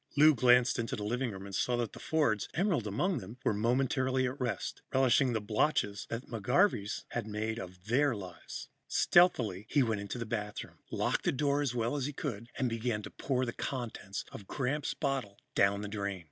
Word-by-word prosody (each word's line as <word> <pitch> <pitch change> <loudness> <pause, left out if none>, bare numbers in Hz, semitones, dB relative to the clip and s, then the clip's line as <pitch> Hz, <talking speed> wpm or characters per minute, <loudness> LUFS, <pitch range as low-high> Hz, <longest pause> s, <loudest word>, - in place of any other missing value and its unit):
Lou 155 +2 +8
glanced 125 0 +4
into 115 - -1
the 105 - -5
living 120 +4 -1
room 95 -2 -7
and 100 - -9
saw 120 +5 +1
that 120 -3 -2
the - - -9
Fords, 120 -11 +1
Emerald 170 - +1
among 165 - 0
them, 105 +4 -9
were - - +3
momentarily 130 +4 +1
at 130 +3 -3
rest, 125 -2 -2
relishing 130 -1 +4
the 110 - +1
botches 105 -1 0
that 115 - -3
the 115 - -4
McGarveys 125 - +2
had 120 -3 -3
made 110 +2 -2
of 90 -2 -9
their 130 +3 +3
lives. 95 -4 -8 0.2
Stealthily, 110 - +3
he 145 - +4
went 110 -4 0
into 100 +4 -5
the 115 - -3
bathroom, 105 -2 -4
locked - - 0
the - - +4
door 140 +1 +1
as 130 -4 -1
well 120 +3 0
as 140 -2 -1
he 145 - -5
could 115 -6 -4
and 130 - +1
began 115 -2 -1
to - - -8
pour 130 -2 -1
the 120 - -3
contents 120 -7 -4
of 100 - -9
Gramps' 140 +2 -1
bottle 135 -9 -2 0.2
down 100 +1 +3
the 105 - -4
drain. 100 -2 -3
120 Hz, 200 wpm, -32 LUFS, 105-135 Hz, 0.2 s, Lou